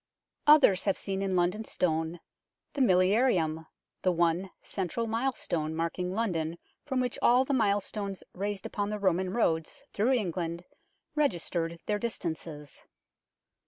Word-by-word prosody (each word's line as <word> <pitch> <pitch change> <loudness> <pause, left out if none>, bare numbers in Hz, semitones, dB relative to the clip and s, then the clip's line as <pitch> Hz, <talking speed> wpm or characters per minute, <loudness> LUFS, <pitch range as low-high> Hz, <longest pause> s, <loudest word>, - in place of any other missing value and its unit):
Others 285 -11 +6
have 195 - +2
seen 195 -1 -3
in 195 -1 0
London 180 +5 +1
Stone 165 -3 -1 0.5
the 280 - -1
milli 185 -5 +5
arium, 165 -9 +2 0.3
the 185 - +3
one 170 +2 +1
central 195 +4 -2
milestone 225 -10 -1
marking 170 +2 -2
London 170 -6 -1 0.3
from 265 -3 -1
which 250 -1 -1
all 250 +2 +5
the 280 - -1
milestones 205 -3 0
raised 200 +1 -3
upon 205 0 -2
the 210 - -2
Roman 190 -2 +1
roads 165 -7 0
through 230 +6 +2
England 175 -6 -2 0.5
registered 170 - 0
their 210 -1 0
distances. 160 - -4
190 Hz, 130 wpm, -29 LUFS, 170-220 Hz, 0.5 s, Others